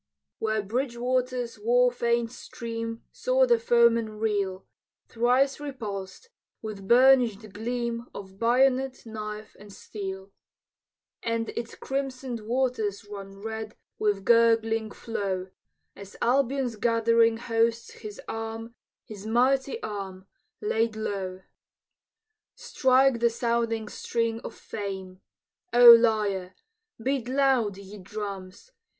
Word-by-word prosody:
Where 215 -1 0
Bridgewater's 245 +1 -1
war 245 +3 +3
famed 235 -1 0
stream 230 -2 -6
Saw - - +2
the 475 -2 +3
foemen 235 - +3
reel, 200 -3 -1 0.4
Thrice 250 +4 +2
repulsed, 225 - -6 0.3
with 205 -3 -7
burnish'd 240 -4 +4
gleam 235 +2 -3
Of 195 -1 -10
bayonet, 260 +2 +2
knife, 215 -1 -7
and 205 0 -13
steel; 195 -1 -7 0.9
And 230 0 -2
its 235 0 -5
crimson'd 265 -3 -4
waters 230 -5 -1
run 200 -1 -9
Red 220 -1 -5 0.2
with 205 -2 0
gurgling 225 -1 +3
flow, 195 -4 -4 0.4
As 200 0 -11
Albion's 260 -1 +1
gathering 230 0 +3
hosts 230 0 0
his 210 -1 -9
arm, 225 +1 -5 0.3
His 210 -1 -9
mighty 260 +2 +1
arm, 195 -3 -6 0.4
laid 225 - 0
low. 190 -3 -4 1.1
Strike 260 -2 +3
the 235 0 +4
sounding 230 -1 -1
string 230 +1 -2
of - - -8
fame, 190 -3 -6 0.5
O 240 0 +10
lyre! 210 -5 +3 0.4
Beat 260 +1 -1
loud, 255 -6 +2
ye 200 +1 -11
drums! 195 - -7
230 Hz, 105 wpm, -27 LUFS, 205-245 Hz, 1.1 s, O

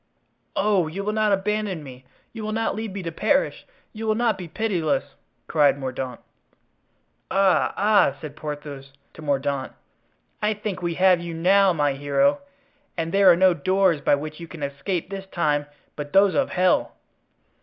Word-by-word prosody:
"Oh! 195 -5 +2
you 190 +6 -5
will 210 +1 -1
not 215 -1 +2
abandon 200 -3 -1
me! 130 -2 -12 0.3
You 225 -2 -7
will 215 0 -3
not 225 +1 0
leave 220 -1 -4
me 195 0 -6
to 165 - -4
perish! 280 - 0 0.3
You 220 0 -5
will 215 - +2
not 230 -2 +1
be 185 -2 -8
pitiless!" 165 -7 -1 0.3
cried 145 -3 +3
Mordaunt. 130 -2 -5 1.1
"Ah! 195 -1 +3
ah!" 200 -8 +4
said 150 -1 -8
Porthos 145 -3 -7 0.2
to - - -12
Mordaunt, 140 -2 -1 0.7
"I 210 0 +1
think 205 -3 -5
we 170 -1 -2
have 185 -1 +4
you 170 -1 -6
now, 190 +3 +4
my 145 -4 +1
hero! 210 - +1 0.6
and 165 0 -2
there 195 -1 +6
are - - +5
no 185 0 +5
doors 185 -3 +2
by 140 - +3
which 155 +2 -7
you 170 - -8
can 160 -2 -9
escape 150 +6 -3
this 195 -1 -6
time 150 -5 0 0.3
but 145 +1 -7
those 195 0 +5
of 280 - +1
hell." 185 0 +2
180 Hz, 170 wpm, -24 LUFS, 145-200 Hz, 1.1 s, there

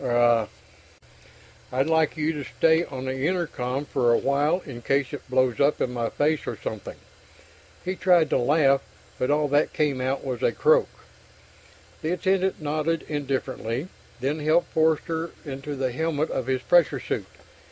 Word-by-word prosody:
Er 120 -2 +3 1.2
I'd 130 +2 +1
like 160 0 +2
you 155 +1 0
to 145 -2 -5
stay 160 +1 +4
on 130 -1 -7
the 130 0 -3
intercom 150 -7 -2
for 125 -4 +1
a 115 - +5
while 145 +6 +1
in 120 -5 -8
case 135 +1 0
it 140 - -8
blows 130 -2 +2
up 145 +1 +3
in 125 - -1
my 115 -2 -1
face 150 +1 0
or - - -3
something." - - -6 0.9
He 185 +1 -2
tried 180 -5 +3
to - - +3
laugh, 140 +1 +3 0.4
but 125 - 0
all 150 0 +2
that 145 +2 +2
came 145 -4 0
out 130 +2 -2
was 125 -3 -3
a - - +2
croak. 475 +2 +3 1.1
The 165 +1 -1
attendant 190 +1 0
nodded 155 +2 -1
indifferently, 135 -1 -3 0.3
then 140 +5 -1
helped 155 +3 +1
Forster 160 +1 +1
into 140 +1 -5
the 130 -2 -1
helmet 155 +2 -1
of 130 - -2
his 130 -1 -1
pressure 175 -3 +4
suit. - - -3
145 Hz, 165 wpm, -25 LUFS, 130-160 Hz, 1.2 s, a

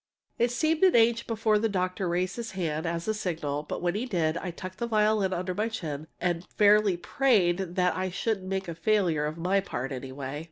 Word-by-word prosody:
It 235 - +3
seemed 310 +6 0
an 375 - +6
age 230 0 +4
before 220 -2 +2
the 225 +1 +1
doctor 185 -1 -1
raised 180 +2 -1
his 230 -3 -5
hand 165 -3 -2
as 170 +2 -3
a 220 - +2
signal, 160 -8 -2
but 150 - -6
when 175 -1 +1
he 225 +6 -2
did 165 -7 0
I 180 - -4
tucked 185 +2 -8
the 235 - -1
violin 215 -3 +2
under 185 0 -2
my 215 +5 -1
chin 155 -8 -5
and 175 -1 -1
fairly 210 -2 +5
prayed 185 -6 +1
that 180 -1 +2
I 185 0 -1
shouldn't 190 +1 -2
make 190 0 -2
a 170 - -4
failure 170 -4 +1
of 155 +2 -5
my 185 +4 +2
part, 135 -8 -4
anyway! 135 +2 -5
185 Hz, 210 wpm, -28 LUFS, 170-215 Hz, -, an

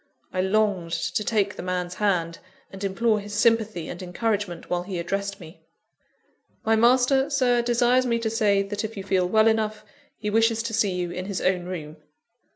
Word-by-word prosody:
I 185 - +1
longed 190 -3 +1
to 210 - -1
take 205 -2 0
the - - -6
man's 180 0 -3
hand, 180 -5 0 0.3
and 195 +1 -8
implore 215 +3 +1
his 205 0 -7
sympathy 220 -5 +2
and 175 - -7
encouragement 190 -1 -2
while 175 0 -1
he 185 0 -5
addressed 200 +3 -3
me. 165 -1 -13 1.0
"My 225 0 +4
master, 255 +4 +4
Sir, 255 -4 +2
desires 245 +1 +2
me 235 -1 +1
to 230 -1 -1
say 205 -3 +2
that, 205 +2 -4
if 220 0 -5
you 195 - -4
feel 185 -2 +1
well 220 +2 +4
enough, 215 -1 0 0.3
he 210 -1 -3
wishes 225 +1 +2
to 230 -1 -4
see 210 -3 +1
you 175 -1 -2
in 180 +1 -5
his 195 -1 -3
own 185 -1 0
room." 160 -4 -6
205 Hz, 185 wpm, -25 LUFS, 185-225 Hz, 1.0 s, My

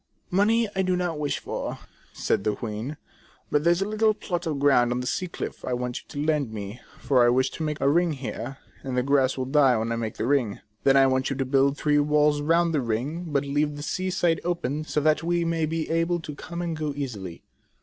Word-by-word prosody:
"Money 220 +5 +3
I 190 - +2
do 185 -1 +1
not 175 -4 -2
wish 145 -1 -1
for," - - -4 0.3
said - - -1
the 105 0 0
queen, 115 +7 -5 0.5
"but 150 0 +2
there 170 +1 +4
's 190 - 0
a - - -4
little 215 0 +2
plot 175 -4 -3
of 155 -3 -1
ground 135 -4 +4
on 125 - 0
the 125 - -4
sea 185 +8 -1
cliff - - -6
I 125 - -2
want 125 0 -2
you - - -19
to 145 +1 -4
lend 150 -6 +1
me, 105 +1 -7 0.2
for 130 -3 +3
I 120 - +5
wish 130 +2 +2
to - - -8
make 150 -1 -2
a - - +1
ring 165 +1 +2
there, 135 +1 -5 0.2
and 130 -2 -4
the 125 - +2
grass 135 -1 +2
will 130 - -1
die 135 -2 +4
when 110 +1 -2
I 115 - -1
make 110 -2 -4
the - - -1
ring. 125 -6 +1 0.3
Then 135 0 +6
I 135 - +7
want 130 0 +1
you 135 - -2
to 135 0 -1
build 135 +1 +2
three 145 -1 +2
walls 150 0 +3
round 165 +2 +2
the 150 - +2
ring, 130 +9 -2
but 145 -3 0
leave 145 +1 0
the 145 - -7
sea 185 +4 -2
side 175 -3 +1
open, 155 -4 -2
so 150 - -1
that 155 +1 +3
we 170 0 0
may 165 -1 0
be 160 0 -2
able 165 +1 +1
to 150 - -7
come 170 +4 -6
and 170 -2 -2
go 155 -2 -2
easily." 105 -12 -6
145 Hz, 245 wpm, -26 LUFS, 130-165 Hz, 0.5 s, I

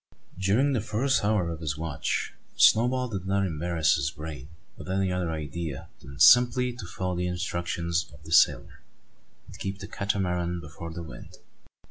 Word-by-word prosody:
During 110 +10 +2
the 120 - 0
first 120 +5 0
hour 100 -5 +1
of 80 - -6
his 75 -2 -3
watch, 80 -4 -2 0.2
Snowball 125 +3 +4
did 95 -4 -5
not 100 0 +1
embarrass 80 -2 +1
his 70 -2 0
brain 75 -3 -8 0.3
with - - -10
any 95 0 0
other 90 -2 -1
idea 80 -1 -5
than 70 0 -11
simply 125 0 +6
to 120 -7 -8
follow 90 0 -3
the 90 0 -1
instructions 85 -1 -2
of 75 +2 -16
the 80 - -11
sailor, 80 - +3 0.6
and - - -13
keep 95 0 -4
the 95 0 -8
Catamaran 90 -3 -1
before 85 +2 -8
the 85 +1 -6
wind. 75 - -11
90 Hz, 165 wpm, -27 LUFS, 80-100 Hz, 0.6 s, simply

